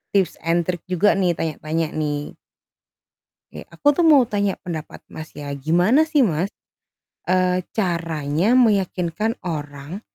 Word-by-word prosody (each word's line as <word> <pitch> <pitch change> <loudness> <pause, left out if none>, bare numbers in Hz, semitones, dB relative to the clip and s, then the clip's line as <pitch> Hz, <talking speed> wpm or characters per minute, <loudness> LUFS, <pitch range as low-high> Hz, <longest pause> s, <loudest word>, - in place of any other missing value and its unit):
tips 190 -4 +2
and 170 +1 +1
trick 175 -2 -2
juga 185 +3 +3
nih 180 -2 +2
tanya-tanya 160 0 -2
nih. 150 -1 -2 1.2
Kek - - -10
aku - - -14
tuh 345 - +3
mau 295 -4 +7
tanya 205 -2 0
pendapat 160 -3 -6
Mas 155 0 -9
ya, 145 -1 -7
gimana 175 - +3
sih, 315 -2 +1
Mas, 175 +2 -1 0.8
eee, 185 0 +2 0.2
caranya 170 - 0
meyakinkan 205 -2 +1
orang, 145 +1 -6
175 Hz, 130 wpm, -21 LUFS, 155-200 Hz, 1.2 s, mau